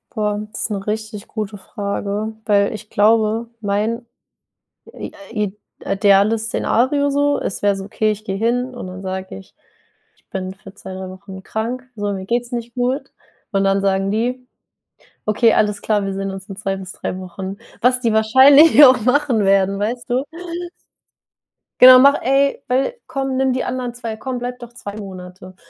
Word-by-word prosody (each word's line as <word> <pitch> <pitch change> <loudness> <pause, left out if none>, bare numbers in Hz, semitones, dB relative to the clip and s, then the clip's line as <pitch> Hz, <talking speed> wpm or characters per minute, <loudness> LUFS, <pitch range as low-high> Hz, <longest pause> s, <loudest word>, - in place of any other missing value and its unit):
Boah, 210 -1 -1
das - - -4
ist - - -1
'ne 195 -1 -3
richtig 215 -1 -4
gute 215 -2 -5
Frage, 200 +2 -4
weil 200 -1 +3
ich 215 0 -9
glaube, 220 +2 +2
mein 215 +4 -1 0.9
i - - -7 0.2
i 210 -3 -2 0.3
ideales 205 +2 +3
Szenario 280 +5 +1
so 285 0 +1
es 190 - -4
wäre 205 -1 +2
so, 195 - -6
okay, 215 +1 0
ich 215 +1 -7
gehe 195 -2 -3
hin 245 +3 0
und 245 - -7
dann 185 +1 -8
sage 190 - -5
ich: 95 - -15 0.6
„Ich - - -35
bin 190 0 -4
für 195 0 -14
2, 190 -1 -9
3 190 0 -6
Wochen 190 0 -10
krank. 235 +4 -3
So, 205 -1 -2
mir 190 -1 -5
geht's 240 +3 -1
nicht 235 -1 -5
gut." 260 +3 -2 0.4
Und 195 -2 +1
dann 195 0 +2
sagen 195 0 +1
die: 250 +4 -2 0.8
„Okay, 220 +2 +3
alles 210 -1 +1
klar, 205 -2 0
wir 195 - -3
sehen 195 0 -3
uns 195 0 -9
in 195 - -8
2 195 -1 -3
bis 190 -1 -8
3 185 - -5
Wochen." 190 +1 -7 0.2
was 250 +1 +3
die 230 -3 0
wahrscheinlich 270 +8 +7
auch 255 -2 +5
machen 250 -2 +2
werden, 195 0 +3
weißt 240 +4 -3
du? 255 +2 +1 1.6
Genau: 255 0 +11
„Mach 280 +2 +5
ey, 275 +2 +2
weil 265 - 0
komm, 270 -1 -2
nimm 265 -1 +2
die 255 - -1
anderen 250 -1 -3
2 230 -2 -5
komm, 255 +3 -5
bleibe 245 +1 -5
doch 240 0 -11
2 205 -5 -8
Monate. 185 -2 -10
215 Hz, 175 wpm, -19 LUFS, 195-245 Hz, 1.6 s, Genau